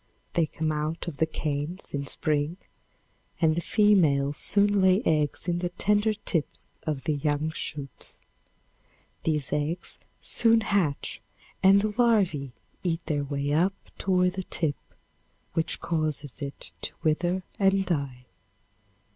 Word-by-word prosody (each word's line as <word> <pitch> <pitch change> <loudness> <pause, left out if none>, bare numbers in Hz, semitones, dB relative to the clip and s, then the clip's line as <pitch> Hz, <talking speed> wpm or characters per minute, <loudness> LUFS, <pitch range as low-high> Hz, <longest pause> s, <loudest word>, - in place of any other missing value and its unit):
They 165 -2 +2
come 155 0 -2
out 155 +3 -2
of 160 -5 -5
the 160 - +2
canes 155 +3 -4
in 140 -1 -2
spring 150 +4 -1 0.8
and 160 -2 +4
the 170 - -1
females 160 -10 +3
soon 205 0 +4
lay 190 +4 +4
eggs 150 +1 +1
in 175 0 +1
the 175 0 -1
tender 210 +4 +2
tips 170 -6 -2
of 145 -4 -2
the 155 -2 0
young 150 +2 0
shoots. 145 -4 -5 1.1
These 150 -4 0
eggs 150 +4 -2 0.2
soon 230 -1 +4
hatch 195 -9 0 0.4
and 195 +1 +6
the 215 -1 0
larvae 190 - +2 0.3
eat 170 -2 -2
their 145 -3 0
way 140 0 -1
up 180 +5 +3 0.2
toward 180 -1 +2
the 190 - -3
tip, 160 -5 -1 0.8
which 165 -1 0
causes 155 -4 -2
it 140 0 -5
to - - -4
wither 175 +4 +1 0.2
and 195 -1 +3
die. 140 -7 -2
160 Hz, 135 wpm, -27 LUFS, 145-190 Hz, 1.1 s, and